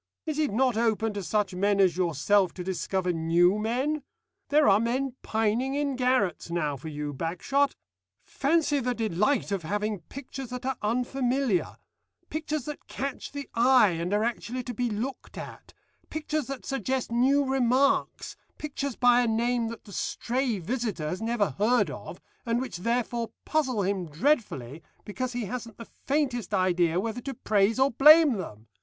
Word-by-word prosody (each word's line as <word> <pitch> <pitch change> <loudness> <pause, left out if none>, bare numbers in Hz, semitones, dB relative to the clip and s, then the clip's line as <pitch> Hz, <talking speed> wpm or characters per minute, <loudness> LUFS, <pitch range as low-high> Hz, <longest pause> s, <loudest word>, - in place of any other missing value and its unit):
Is 310 -2 -2
it 300 -2 +2
not 250 +1 +2
open 225 -1 +1
to 205 - -4
such 205 0 0
men 200 +2 +1
as 185 -4 +4
yourself 180 +2 +2
to 180 - -5
discover 185 0 -1
new 170 +4 +3
men? 260 +8 -1 0.5
There 300 +1 +4
are 200 0 +6
men 250 +3 -1
pining 225 +5 0
in 285 -2 0
garrets 250 -10 +1
now 160 -4 -1
for 140 +4 -9
you, 150 -1 -4
Bagshot. 180 - 0 0.5
Fancy 295 0 +1
the 250 -1 -1
delight 220 +3 0
of 195 -2 -1
having 205 +4 -2
pictures 265 - -8
that 250 0 -6
are 265 0 0
unfamiliar, 250 -1 0 0.6
pictures 310 -3 -3
that 300 -1 -7
catch 275 0 -5
the 285 -1 -6
eye 245 -2 +5
and 170 +2 -3
are 210 +1 +2
actually 240 +2 -3
to 245 - -5
be 245 +2 -1
looked 230 +6 -5
at, - - -9 0.4
pictures 310 -2 -2
that 275 -2 -6
suggest 265 -2 -2
new 270 +4 +3
remarks, 265 +1 +1 0.2
pictures 280 -3 -4
by 245 0 +5
a 245 - +1
name 235 +1 +1
that 230 0 -7
the 200 - -13
stray 245 +2 -1
visitor 200 -5 -3
has 185 - -4
never 225 -6 0
heard 240 +4 +3
of - - -8 0.2
and 235 -1 0
which 260 -8 -4
therefore 235 +3 -1
puzzle 260 -9 0
him 190 -2 -1
dreadfully 155 - -1 0.2
because 255 +4 -4
he 240 -2 -2
hasn't 230 +1 -6
the 230 - -9 0.2
faintest 265 -7 0
idea 180 -2 +2
whether 225 +4 -3
to 270 +1 -5
praise 210 0 +2
or 265 +1 +3
blame 300 +3 +7
them! 110 - -8
235 Hz, 165 wpm, -27 LUFS, 195-265 Hz, 0.6 s, blame